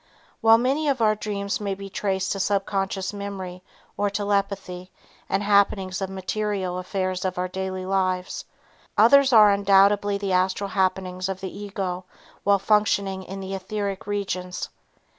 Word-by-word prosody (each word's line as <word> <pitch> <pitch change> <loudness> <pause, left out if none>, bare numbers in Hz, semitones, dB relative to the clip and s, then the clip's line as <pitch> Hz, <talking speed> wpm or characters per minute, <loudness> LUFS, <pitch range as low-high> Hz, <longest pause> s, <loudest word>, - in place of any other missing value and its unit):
While 225 0 +7
many 270 +6 0
of 270 -2 0
our 215 -2 +4
dreams 205 -1 -3
may 200 -2 -2
be 195 0 -8
traced 190 -1 -1
to 195 - -2
subconscious 195 0 -1
memory 195 -3 -6 0.3
or 205 - 0
telepathy 200 -3 -2 0.4
and 195 +1 0
happenings 200 -2 +2
of 190 - -2
material 190 -1 -2
affairs 185 0 -2
of 185 -1 -2
our 180 0 0
daily 185 0 -4
lives, 185 -1 -1 0.5
others 270 +5 +6
are 215 -3 +8
undoubtedly 200 0 +4
the 200 -1 -3
astral 185 +2 +1
happenings 185 -1 -1
of 190 -1 -3
the 190 -1 -6
ego 190 -3 -4 0.4
while 200 0 +4
functioning 200 -1 +1
in 195 +1 -7
the 190 0 -5
etheric 195 0 -4
regions. 185 -3 -3
195 Hz, 145 wpm, -24 LUFS, 185-205 Hz, 0.5 s, are